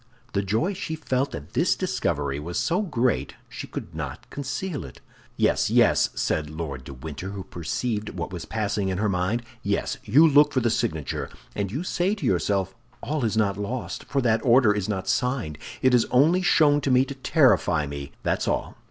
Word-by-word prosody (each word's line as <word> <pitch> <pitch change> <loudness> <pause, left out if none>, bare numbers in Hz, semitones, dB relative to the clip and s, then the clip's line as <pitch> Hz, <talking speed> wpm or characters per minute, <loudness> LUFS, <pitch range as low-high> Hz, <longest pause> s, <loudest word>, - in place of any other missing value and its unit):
The 100 - +1
joy 110 - 0
she 175 -4 -4
felt 135 -3 -1
at 70 - -9
this - - +2
discovery 70 +1 -1
was 85 +4 -4
so 175 +4 +1
great 120 - 0
she - - -7
could - - -7
not - - -6
conceal 140 +4 -4
it. 65 - -11 0.4
"Yes, - - +2
yes," - - +4
said 75 -1 -1
Lord 75 -5 -6
de 70 - -8
Winter, 80 +7 -6
who 100 -1 -6
perceived 105 +6 -3
what - - -5
was - - -5
passing 105 -3 -1
in 95 - -1
her 105 +2 +1
mind; 100 +5 0 0.2
"yes, 100 0 -1
you 145 +10 +6
look 145 0 +5
for 130 - +3
the 120 -2 +1
signature, 105 - -2 0.2
and 100 -2 -2
you 140 +9 -3
say 185 +2 0
to 205 - -5
yourself: 95 +1 +1 0.3
'All 150 -2 -1
is 110 -1 0
not 100 -3 +2
lost, 115 +4 -4
for 140 - 0
that 110 -2 +2
order 120 -3 +5
is 105 0 -2
not 95 -3 -2
signed. 125 - -1 0.2
It 130 -1 +5
is 120 -2 +5
only 160 +8 +4
shown 145 -5 +4
to 140 - -1
me 130 +1 +5
to 140 - -6
terrify 130 - +3
me, 70 -1 -6
that's - - 0
all. - - -2
110 Hz, 195 wpm, -25 LUFS, 95-140 Hz, 0.4 s, you